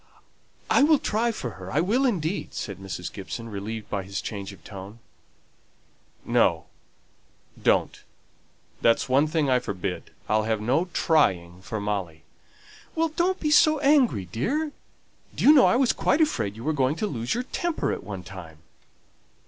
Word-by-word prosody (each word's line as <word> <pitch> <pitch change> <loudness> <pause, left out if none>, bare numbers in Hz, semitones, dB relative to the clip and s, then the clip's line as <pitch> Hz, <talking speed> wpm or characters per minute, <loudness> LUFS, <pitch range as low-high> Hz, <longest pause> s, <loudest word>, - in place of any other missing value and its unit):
"I - - +4
will 305 +2 +6
try 230 -1 0
for 125 - -5
her; 95 -1 -9
I - - +1
will 235 +10 +2
indeed," 185 -4 -2
said 100 -4 -5
Mrs. 95 -3 -6
Gibson, 115 +4 -7
relieved 105 +1 -5
by 100 - -2
his 95 +1 -5
change 100 -2 -6
of 90 -5 -15
tone. 100 +3 -10 1.3
"No, - - +2 1.0
don't. - - +1 0.8
That's 115 - +3
one 135 +4 +3
thing 155 -2 0
I 130 -1 +3
forbid. 95 -5 -5 0.2
I'll 110 +1 +2
have 110 -1 0
no 130 +11 +1
'trying' 95 - +1
for 110 +3 -5
Molly." 95 -6 -3 0.7
"Well, 325 0 +1
don't 350 +4 0
be 300 -1 +1 0.3
angry, 270 - +3
dear! 275 - -2 0.6
Do - - -3
you 295 - +8
know 280 - +7
I - - +3
was 255 -1 +3
quite 285 - +1
afraid 110 - +1
you 115 - -9
were 155 - 0
going 135 0 +1
to 190 - -2
lose 120 - -2
your 245 - -1
temper 335 +5 -2
at - - -4
one 95 -2 -7
time." 90 -5 -10
115 Hz, 160 wpm, -25 LUFS, -, 1.3 s, you